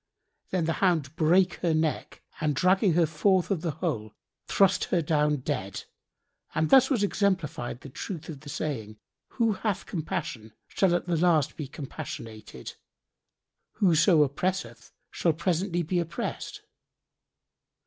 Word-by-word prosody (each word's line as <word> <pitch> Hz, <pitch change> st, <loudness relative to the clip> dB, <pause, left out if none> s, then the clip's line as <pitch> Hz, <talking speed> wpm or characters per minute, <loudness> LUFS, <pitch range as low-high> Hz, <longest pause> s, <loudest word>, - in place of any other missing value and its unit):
Then 180 Hz, -3 st, 0 dB
the 165 Hz, -, +1 dB
hound 160 Hz, -7 st, +1 dB
brake 175 Hz, +3 st, +3 dB
her 170 Hz, -3 st, +2 dB
neck 155 Hz, -1 st, -2 dB, 0.2 s
and 150 Hz, -2 st, 0 dB
dragging 185 Hz, +4 st, +3 dB
her 170 Hz, 0 st, +4 dB
forth 180 Hz, +5 st, +1 dB
of 185 Hz, -5 st, 0 dB
the 170 Hz, -, -1 dB
hole, 140 Hz, -, -3 dB, 0.3 s
threw 195 Hz, -, +5 dB, 0.2 s
her 175 Hz, -, +2 dB
down 150 Hz, -2 st, +1 dB
dead: 95 Hz, -5 st, -3 dB, 0.7 s
and 155 Hz, 0 st, +1 dB
thus 265 Hz, -1 st, +7 dB
was 245 Hz, -8 st, +1 dB
exemplified 165 Hz, -, -1 dB
the 140 Hz, -, -10 dB
truth 165 Hz, +4 st, -6 dB
of 155 Hz, -4 st, -7 dB
the 145 Hz, +1 st, -11 dB
saying, 115 Hz, -9 st, -4 dB, 0.4 s
"Who 230 Hz, -3 st, +2 dB
hath 195 Hz, -1 st, -2 dB
compassion 130 Hz, -, -4 dB
shall 185 Hz, -3 st, +2 dB
at 175 Hz, -, -1 dB
the 175 Hz, -2 st, 0 dB
last 160 Hz, -4 st, +2 dB
be 150 Hz, -, -5 dB
compassionated. 110 Hz, -, -8 dB, 1.0 s
Whoso 170 Hz, -4 st, +4 dB
oppresseth 140 Hz, -5 st, -3 dB, 0.2 s
shall 165 Hz, -, +1 dB
presently 175 Hz, +1 st, 0 dB
be 175 Hz, +3 st, 0 dB
oppressed." 170 Hz, -1 st, -4 dB
160 Hz, 140 wpm, -27 LUFS, 145-185 Hz, 1.0 s, thus